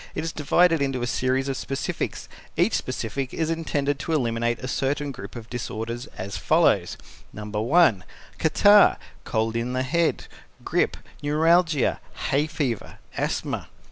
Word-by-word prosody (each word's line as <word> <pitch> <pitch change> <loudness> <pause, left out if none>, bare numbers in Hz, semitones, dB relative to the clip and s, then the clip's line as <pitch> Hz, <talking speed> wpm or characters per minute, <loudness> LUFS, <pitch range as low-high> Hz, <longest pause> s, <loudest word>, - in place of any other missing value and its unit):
It - - -2
is 165 - -3
divided 165 +2 +3
into 135 -3 -1
a - - +1
series 130 +2 0
of 135 - -1
specifics. 135 +1 -3 0.3
Each - - +3
specific 135 -2 -3
is 160 0 0
intended 145 -4 -1
to 160 - -3
eliminate 120 -4 0
a 130 - -6
certain 140 +2 -1
group 100 -4 -9
of 115 -2 -8
disorders 120 +1 -5
as 100 +2 -5
follows: - - +2 0.3
No. 105 - -8
1. 110 - +3 0.4
Catarrh, 205 +6 +6 0.3
cold 110 0 -1
in 120 +2 -1
the 130 0 0
head, 170 +6 0 0.4
grip, - - +1 0.2
neuralgia, 160 0 +3 0.3
hay 145 +3 +2
fever, 145 -8 -3 0.2
asthma. - - -2
135 Hz, 140 wpm, -25 LUFS, 120-155 Hz, 0.4 s, Catarrh